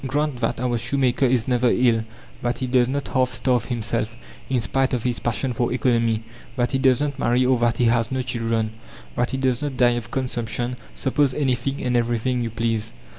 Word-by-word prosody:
Grant 145 Hz, -1 st, -1 dB
that 120 Hz, -2 st, -1 dB
our 120 Hz, -1 st, 0 dB
shoemaker 130 Hz, +2 st, +2 dB
is 120 Hz, -3 st, +1 dB
never 125 Hz, -1 st, +3 dB
ill, 115 Hz, -3 st, +3 dB, 0.4 s
that 120 Hz, 0 st, -1 dB
he 130 Hz, -, -2 dB
does 125 Hz, -1 st, +3 dB
not 140 Hz, +2 st, -3 dB
half 130 Hz, -1 st, +1 dB
starve 125 Hz, -3 st, +1 dB
himself, 115 Hz, -1 st, -2 dB, 0.3 s
in 130 Hz, -1 st, +2 dB
spite 130 Hz, +3 st, +1 dB
of 120 Hz, -, -3 dB
his 125 Hz, -1 st, -1 dB
passion 120 Hz, +2 st, -1 dB
for 120 Hz, +1 st, 0 dB
economy; 115 Hz, -3 st, +1 dB, 0.3 s
that 120 Hz, -2 st, 0 dB
he 135 Hz, -, +1 dB
does 130 Hz, 0 st, +3 dB
not 140 Hz, -2 st, -2 dB
marry 125 Hz, +1 st, +2 dB
or 130 Hz, -1 st, +3 dB
that 120 Hz, 0 st, +1 dB
he 120 Hz, -, +2 dB
has 115 Hz, 0 st, +2 dB
no 130 Hz, -1 st, -1 dB
children; 115 Hz, -3 st, -1 dB, 0.4 s
that 120 Hz, -, 0 dB
he 135 Hz, -, -2 dB
does 130 Hz, -2 st, 0 dB
not 145 Hz, -3 st, -3 dB
die 125 Hz, -1 st, +5 dB
of 120 Hz, -2 st, -3 dB
consumption; 120 Hz, -1 st, -2 dB, 0.2 s
suppose 135 Hz, 0 st, +1 dB
anything 135 Hz, -1 st, -1 dB
and 125 Hz, -1 st, 0 dB
everything 120 Hz, +1 st, 0 dB
you 115 Hz, -, -2 dB
please! 115 Hz, 0 st, -2 dB
125 Hz, 205 wpm, -23 LUFS, 115-130 Hz, 0.4 s, die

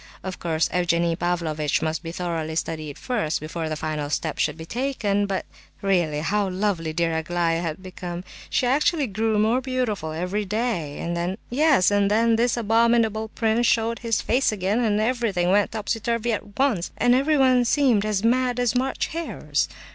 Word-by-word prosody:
Of 190 Hz, -1 st, -5 dB
course, 160 Hz, -2 st, 0 dB
Evgenie 170 Hz, -1 st, +1 dB
Pavlovitch 165 Hz, -4 st, -1 dB
must 160 Hz, 0 st, -1 dB
be 165 Hz, -1 st, -6 dB
thoroughly 165 Hz, -3 st, -3 dB
studied 155 Hz, -3 st, -3 dB
first, 210 Hz, -11 st, -1 dB
before 160 Hz, +1 st, -4 dB
the 155 Hz, -, -2 dB
final 155 Hz, -1 st, -3 dB
step 155 Hz, +1 st, -2 dB
should 150 Hz, 0 st, 0 dB
be 160 Hz, -, -8 dB
taken; 210 Hz, -3 st, -1 dB
but, 195 Hz, -1 st, -2 dB, 0.4 s
really, 175 Hz, -6 st, +1 dB
how 200 Hz, +4 st, 0 dB
lovely 185 Hz, -4 st, -1 dB
dear 165 Hz, 0 st, 0 dB
Aglaya 165 Hz, +1 st, 0 dB
had 165 Hz, +2 st, -4 dB
become—she 180 Hz, +5 st, -4 dB
actually 290 Hz, +4 st, +2 dB
grew 220 Hz, 0 st, 0 dB
more 225 Hz, +4 st, +2 dB
beautiful 245 Hz, -11 st, -2 dB
every 180 Hz, +6 st, -2 dB
day! 205 Hz, -8 st, -2 dB
And 170 Hz, 0 st, -3 dB
then—Yes, 205 Hz, -, +2 dB
and 205 Hz, -1 st, +3 dB
then—this 230 Hz, +3 st, +2 dB
abominable 225 Hz, -1 st, +2 dB
prince 225 Hz, +1 st, +1 dB
showed 230 Hz, 0 st, +1 dB
his 230 Hz, -2 st, 0 dB
face 255 Hz, +2 st, +2 dB
again, 205 Hz, +2 st, 0 dB
and 215 Hz, -3 st, +1 dB
everything 215 Hz, -6 st, +1 dB
went 205 Hz, +1 st, +3 dB
topsy 220 Hz, +1 st, -2 dB
turvy 230 Hz, +1 st, -1 dB
at 205 Hz, -1 st, -6 dB
once, 255 Hz, -11 st, +1 dB
and 245 Hz, -, +4 dB
everyone 265 Hz, -2 st, +4 dB
seemed 240 Hz, -4 st, +3 dB
as 210 Hz, -2 st, -1 dB
mad 250 Hz, +1 st, +2 dB
as 245 Hz, -2 st, +2 dB
March 260 Hz, +1 st, 0 dB
hares. 330 Hz, 0 st, -2 dB
205 Hz, 165 wpm, -24 LUFS, 170-235 Hz, 0.4 s, and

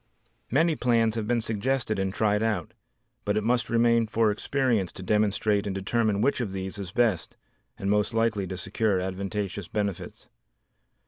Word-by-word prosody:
Many 160 Hz, +5 st, +3 dB
plans 115 Hz, -4 st, +2 dB
have 110 Hz, -2 st, -3 dB
been 120 Hz, 0 st, +1 dB
suggested 110 Hz, 0 st, -1 dB
and 95 Hz, 0 st, 0 dB
tried 105 Hz, +1 st, +1 dB
out, 105 Hz, -7 st, -1 dB, 0.5 s
but 105 Hz, +1 st, 0 dB
it 110 Hz, -, 0 dB
must 120 Hz, +1 st, +1 dB
remain 115 Hz, -1 st, +3 dB
for 110 Hz, 0 st, +2 dB
experience 115 Hz, -4 st, 0 dB
to 95 Hz, -, -8 dB
demonstrate 105 Hz, +1 st, +1 dB
and 95 Hz, -, -3 dB
determine 105 Hz, +1 st, 0 dB
which 135 Hz, +2 st, +2 dB
of 100 Hz, -5 st, -3 dB
these 95 Hz, +2 st, -5 dB
is 95 Hz, -3 st, -5 dB
best 110 Hz, -6 st, 0 dB, 0.4 s
and 95 Hz, -, -4 dB
most 105 Hz, +2 st, +2 dB
likely 115 Hz, -4 st, 0 dB
to 95 Hz, 0 st, -5 dB
secure 95 Hz, +2 st, 0 dB
advantageous 95 Hz, 0 st, -3 dB
benefits. 100 Hz, -4 st, -4 dB
105 Hz, 165 wpm, -27 LUFS, 100-115 Hz, 0.5 s, Many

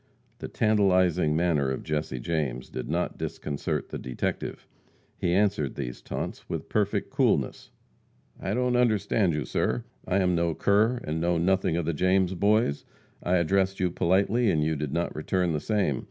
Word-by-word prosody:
The -, -, -5 dB
tantalizing 95 Hz, -7 st, +2 dB
manner 80 Hz, -5 st, +2 dB
of 65 Hz, -, -3 dB
Jesse 75 Hz, -4 st, -2 dB
James 65 Hz, -4 st, -2 dB
did 65 Hz, -, -5 dB
not 85 Hz, +3 st, -2 dB
disconcert 70 Hz, -1 st, -3 dB
the -, -, -5 dB
detective. 65 Hz, -1 st, -4 dB, 0.5 s
He 85 Hz, -, -1 dB
answered 95 Hz, -7 st, +1 dB
these 60 Hz, -4 st, -5 dB
taunts -, -, -6 dB
with -, -, -4 dB
perfect 105 Hz, -2 st, 0 dB
coolness: -, -, +1 dB, 0.7 s
"I 95 Hz, +3 st, -2 dB
don't 125 Hz, 0 st, +1 dB
understand 110 Hz, -6 st, +2 dB
you, 75 Hz, -3 st, -2 dB
sir. 60 Hz, -1 st, -1 dB, 0.2 s
I 95 Hz, -, +1 dB
am 90 Hz, -2 st, +2 dB
no 85 Hz, -1 st, +1 dB
cur, 110 Hz, +5 st, +2 dB
and 80 Hz, +1 st, -3 dB
know 85 Hz, 0 st, +1 dB
nothing 90 Hz, -1 st, +1 dB
of 85 Hz, -, -1 dB
the 85 Hz, -, 0 dB
James 95 Hz, +3 st, +2 dB
Boys. 100 Hz, -4 st, +2 dB, 0.4 s
I 90 Hz, -, +1 dB
addressed 95 Hz, +2 st, +1 dB
you 90 Hz, -2 st, +1 dB
politely, 100 Hz, +7 st, +2 dB
and 80 Hz, -5 st, +2 dB
you 80 Hz, +1 st, 0 dB
did 75 Hz, -1 st, -3 dB
not 85 Hz, +3 st, -2 dB
return 90 Hz, +3 st, 0 dB
the 75 Hz, -, 0 dB
same. 95 Hz, -, 0 dB
85 Hz, 170 wpm, -27 LUFS, 75-100 Hz, 0.7 s, tantalizing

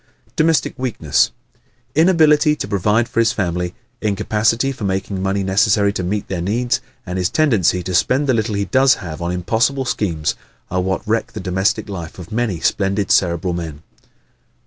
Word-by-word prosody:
Domestic 160 Hz, -1 st, +2 dB
Weakness 110 Hz, -, +1 dB, 0.3 s
¶ -, -, -36 dB, 0.3 s
Inability 155 Hz, -2 st, +4 dB
to -, -, -5 dB
provide 105 Hz, +3 st, +1 dB
for -, -, -2 dB
his 115 Hz, -1 st, +3 dB
family, 90 Hz, -2 st, -2 dB, 0.3 s
incapacity 110 Hz, +4 st, +1 dB
for 130 Hz, -5 st, -8 dB
making 95 Hz, 0 st, -2 dB
the -, -, -4 dB
money 95 Hz, +1 st, 0 dB
necessary 100 Hz, +1 st, +2 dB
to 100 Hz, -, -2 dB
meet 100 Hz, +3 st, -2 dB
their 90 Hz, -3 st, -3 dB
needs, 115 Hz, +7 st, 0 dB, 0.2 s
and 90 Hz, +1 st, -3 dB
his 90 Hz, -1 st, +1 dB
tendency 105 Hz, -, +2 dB
to 90 Hz, -, -4 dB
spend 125 Hz, +10 st, +2 dB
the 130 Hz, -, +2 dB
little 110 Hz, -2 st, 0 dB
he 100 Hz, 0 st, 0 dB
does 130 Hz, +7 st, +4 dB
have 80 Hz, -2 st, -7 dB
on 85 Hz, +1 st, -2 dB
impossible 115 Hz, +10 st, 0 dB
schemes, 85 Hz, -10 st, -1 dB, 0.4 s
are 90 Hz, 0 st, +1 dB
what 95 Hz, +3 st, -2 dB
wreck 115 Hz, +1 st, -1 dB
the -, -, -5 dB
domestic 95 Hz, +5 st, 0 dB
life 85 Hz, -5 st, -7 dB
of 90 Hz, +3 st, -10 dB
many 110 Hz, -6 st, -1 dB
splendid 100 Hz, +1 st, 0 dB
Cerebral 90 Hz, 0 st, +2 dB
men. 80 Hz, -3 st, -6 dB
100 Hz, 175 wpm, -19 LUFS, 90-115 Hz, 0.4 s, Inability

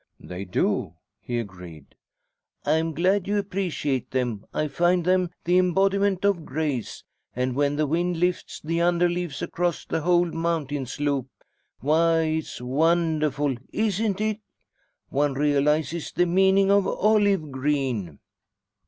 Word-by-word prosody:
"They 90 Hz, +2 st, -7 dB
do," 90 Hz, -2 st, -1 dB, 0.2 s
he 120 Hz, +4 st, -4 dB
agreed. 90 Hz, -, -8 dB, 0.7 s
"I'm 160 Hz, +2 st, +1 dB
glad 185 Hz, +5 st, +1 dB
you 205 Hz, +1 st, +1 dB
appreciate 180 Hz, -, -2 dB
them. 120 Hz, -5 st, -2 dB
I 155 Hz, -, -1 dB
find 175 Hz, +3 st, +1 dB
them 185 Hz, -1 st, +2 dB
the 180 Hz, +2 st, +3 dB
embodiment 195 Hz, +1 st, +2 dB
of 195 Hz, -5 st, +2 dB
grace. 145 Hz, -5 st, -3 dB, 0.3 s
And 125 Hz, 0 st, -1 dB
when 145 Hz, +1 st, +1 dB
the 155 Hz, +1 st, +1 dB
wind 170 Hz, +4 st, 0 dB
lifts 180 Hz, +1 st, -1 dB
the 165 Hz, +2 st, -2 dB
under 175 Hz, 0 st, +3 dB
leaves 175 Hz, -4 st, -3 dB
across 175 Hz, 0 st, -2 dB
a 160 Hz, -, 0 dB
whole 175 Hz, +2 st, +3 dB
mountain 155 Hz, -5 st, -2 dB
slope 140 Hz, -1 st, -1 dB, 0.5 s
why, 165 Hz, +4 st, +3 dB
it's 160 Hz, 0 st, -2 dB
wonderful, 150 Hz, 0 st, +1 dB, 0.2 s
isn't 210 Hz, -1 st, 0 dB
it? 215 Hz, 0 st, -1 dB, 0.7 s
One 145 Hz, 0 st, 0 dB
realises 150 Hz, +2 st, +1 dB
the 175 Hz, -, +2 dB
meaning 190 Hz, +2 st, +4 dB
of 200 Hz, -1 st, +4 dB
'olive 205 Hz, -7 st, +2 dB
green'." 130 Hz, -, -1 dB
160 Hz, 130 wpm, -25 LUFS, 140-180 Hz, 0.7 s, meaning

